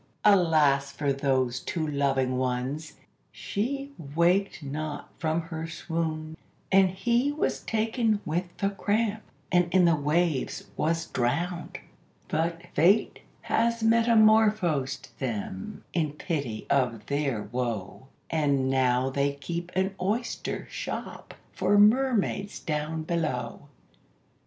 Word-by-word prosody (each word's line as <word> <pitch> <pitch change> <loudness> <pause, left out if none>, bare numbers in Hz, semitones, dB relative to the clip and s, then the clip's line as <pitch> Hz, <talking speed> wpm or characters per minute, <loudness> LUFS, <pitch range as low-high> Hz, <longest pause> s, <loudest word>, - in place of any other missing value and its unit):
Alas 155 -8 +4
for 140 -2 -1
those 130 -2 0
two 160 +3 -3
loving 135 -3 +1
ones! 130 +5 -2 0.4
she 275 +7 -3 0.2
waked 175 +1 +2
not 145 +1 -5
from 160 +1 0
her 160 -1 -6
swound, 160 -1 -3 0.4
And 190 -1 +6
he 240 +8 +1
was 295 - -1
taken 225 -1 0
with 170 +4 -1
the 200 -1 0
cramp, 215 +2 0 0.3
and 175 -1 +3
in, 185 0 +5
the 170 -1 +5
waves 150 0 0
was 165 +1 0
drowned; 170 +9 -2 0.5
But 165 +1 -1
Fate 185 +8 +3 0.2
has 230 -1 +1
metamorphosed 215 - +3
them, 105 -6 -4
in 155 -4 0
pity 140 - -3
of 120 -6 +1
their 140 -6 -1
wo, 115 0 -4 0.2
And 140 -4 +1
now 130 0 +2
they 140 +1 +1
keep 170 +6 -5
an 190 +1 +1
oyster 220 +6 -2
shop - - -6 0.2
for 205 - +2
mermaids 210 -2 +3
down 155 +1 -2
below. 150 -6 -3
160 Hz, 115 wpm, -27 LUFS, 140-195 Hz, 0.5 s, And